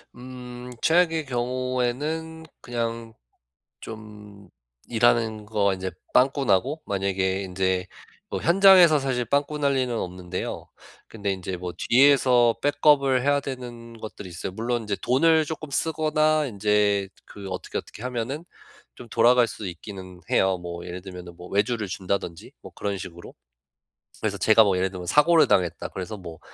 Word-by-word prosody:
음 125 0 -9
최악의 165 -2 +3
경우에는 130 +6 -2 0.2
그냥 115 -1 -4 0.7
좀 105 -2 -11 0.4
일하는 115 -2 +2
거 105 -2 +1
이제 95 0 -4 0.2
빵꾸 135 +2 +3
나고 130 +9 +1
만약에 95 -1 -1
인제 95 -1 -1 0.4
뭐 - - -3
현장에서 180 -3 +7
사실 130 -3 -1
빵꾸 145 +5 0
날 140 -1 +1
리는 130 -2 0
없는데요. 90 -2 -5 0.4
근데 105 -3 -3
이제 95 -1 -4
뭐 90 0 -6
뒤에서 125 -2 +4
백업을 145 -3 +3
해야 145 +1 +2
되는 120 -3 -8
것들이 105 -3 -8
있어요. 85 +2 -6
물론 120 +4 -2
이제 105 -2 -2
돈을 160 +5 +4
쪼끔 155 -1 -6
쓰거나 155 0 +1
인제 105 -3 +1 0.2
그 100 -1 -10
어떻게, 95 - -4
어떻게 - - -9
하면은 125 +5 -4 0.5
좀 125 - -11
돌아갈 120 +2 +4
수 105 -3 -7
있기는 95 0 -9
해요. 95 -1 +2
뭐 85 0 -7
예를 90 +1 -6
들면은 90 -2 -10
뭐 90 +1 -11
외주를 110 +2 0
준다든지 95 -2 -4
뭐 - - -12
그런 100 -1 -3
식으로. 85 -1 -10 0.9
그래서 - - -1
제가 110 0 +6
뭐 100 -3 +2
예를 95 +1 0
들면 90 -2 -8
'사고를 155 - +5
당했다.' 90 -5 +1
그래서 100 +3 -6
뭐 85 -3 -10
115 Hz, 310 characters per minute, -25 LUFS, 95-135 Hz, 0.9 s, 현장에서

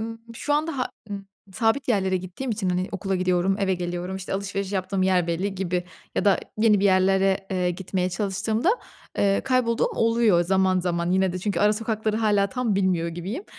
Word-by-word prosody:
ımm, 225 +1 -5 0.2
şu 290 - -2
anda, 305 -1 -1
ha, 255 - 0 0.2
ımm, 200 -1 -6 0.3
sabit 225 +7 +1
yerlere 190 -5 +2
gittiğim 185 +8 -5
için, 205 -4 -1
hani, 180 +1 0
okula 195 0 -2
gidiyorum, 185 +1 +1
eve 195 -2 +1
geliyorum, 175 +1 -4
işte 190 0 -5
alışveriş 200 0 -3
yaptığım 190 0 -1
yer 185 -2 +2
belli 185 +4 -1
gibi 180 -2 -2 0.3
ya - - 0
da 200 -2 +4 0.2
yeni 215 -2 +4
bir - - +1
yerlere, 195 0 +3
eee, 180 -2 +1
gitmeye 185 0 -2
çalıştığımda. 210 - 0 0.5
Eee, 200 -1 +3
kaybolduğum 255 -3 +1
oluyor 230 -5 +3
zaman 190 0 +2
zaman 170 -1 -1
yine 190 0 +2
de 180 - -3
çünkü 200 +2 -1
ara 210 +1 +5
sokakları 220 0 -1
hâlâ 205 -3 +2
tam 250 -4 -1
bilmiyor 185 -4 +1
gibiyim. 185 - -5
195 Hz, 185 wpm, -24 LUFS, 185-215 Hz, 0.5 s, ara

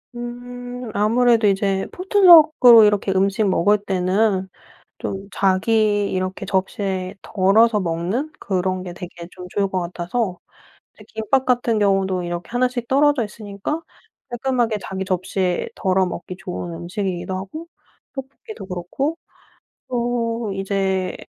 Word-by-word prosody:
음. 245 0 -7
아무래도 230 +1 +3
이제 195 -1 +1
포트럭으로 325 - +7
이렇게 205 -2 +2
음식 195 +2 +2
먹을 195 +2 +3
때는 190 0 0 0.5
좀 195 0 -5
자기 205 +1 +2
이렇게 185 +1 -3
접시에 190 -1 -2
덜어서 210 +3 +3
먹는 185 - -2
그런 185 -1 -1
게 180 -1 -7
되게 175 -1 -9
좀 180 - -10
좋을 200 0 0
것 190 -1 -2
같아서 180 +3 -3 0.6
이제 - - -16
김밥 255 +5 0
같은 245 -3 +1
경우도 195 -2 +1
이렇게 175 0 -5
1 245 +1 +2
씩 245 -1 -5
떨어져 280 -1 +3
있으니까 210 +8 -5 0.5
깔끔하게 240 -2 0
자기 190 0 -5
접시에 185 -1 -1
덜어 190 0 +1
먹기 180 +1 -6
좋은 180 -2 -6
음식이기도 180 +1 -4
하고 200 - -7 0.5
떡볶이도 275 - -9
그렇고 190 - -3 0.7
또 235 -3 -1
이제 195 -1 -1
200 Hz, 280 characters per minute, -21 LUFS, 185-240 Hz, 0.7 s, 포트럭으로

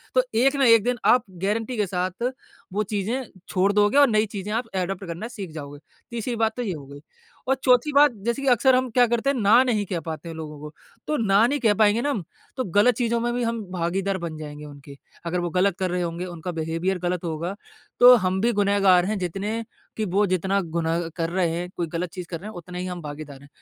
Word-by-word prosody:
तो 255 - +5 0.2
एक 270 +3 +3
ना 275 -1 +3
एक 230 -3 +6
दिन 245 +1 0
आप 250 - +5 0.2
गारंटी 225 +4 -1
के 210 - +2
साथ 185 +3 -3 0.5
वो 210 +2 +1
चीजें 215 +5 -2 0.3
छोड़ 190 +1 +2
दोगे 210 +5 +3
और 285 -1 +7
नई 215 -1 +3
चीज़े 200 +1 -4
आप 230 +3 -1
एडॉप्ट 190 +1 -2
करना 170 +5 -5
सीख 205 -8 -8
जाओगे। 145 -2 -8 0.3
तीसरी 235 +1 -3
बात 225 -1 +1
तो - - -2
ये 200 -5 -2
हो 145 -4 -9
गई 140 +1 -11 0.5
और 265 - +4
चौथी 250 +4 +4
बात 290 0 +6
जैसे 235 +4 -1
कि 275 - -3
अक्सर 255 +2 +4
हम 255 0 +1
क्या 245 +2 +5
करते 235 +3 0
है 280 - -2
ना 220 +5 +6
नहीं 220 -5 0
कह 180 -2 -3
पाते 160 0 -6
है 165 - -7
लोगों 155 -2 -7
को, 150 +1 -9 0.3
तो 300 - 0
ना 210 -2 +4
नहीं 285 +3 -1
कह 225 -5 +3
पाएँगे 215 +2 +3
ना 290 - 0
हम 210 -10 -2 0.3
तो 260 - 0
गलत 205 +6 +3
चीज़ों 235 0 0
में 240 +1 0
भी 245 - -1
हम 230 -1 -1
भागीदार 190 +3 -1
बन 165 -2 -5
जाएँगे 150 -1 -8
उनके 140 -1 -12 0.3
अगर 175 +1 -1
वो 175 0 -2
गलत 185 +2 +1
कर 185 -1 0
रहे 180 0 -1
होंगे 170 +1 -3
उनका 175 0 -6
बिहेवियर 165 +3 -2
गलत 180 0 -1
होगा 170 +3 -3 0.4
तो 250 +1 +10
हम 185 -4 0
भी 235 +2 +3
गुनहगार 200 -3 +4
है 215 +2 -1
जितने 195 +5 -3 0.3
की 215 - -1
वो 205 +3 +3
जितना 190 +2 +1
गुनाह 165 0 -2
कर 165 -2 -1
रहे 180 -1 +1
हैं, 175 +1 -4
कोई 170 - -1
गलत 170 +2 -3
चीज़ 180 -1 -7
कर 165 - -5
रहे 200 - -9
हैं - - -10
उतना 180 +1 -8
ही 180 - -3
हम 180 -1 -5
भागीदार 145 -2 -8
है। - - -15
195 Hz, 240 wpm, -24 LUFS, 170-230 Hz, 0.5 s, तो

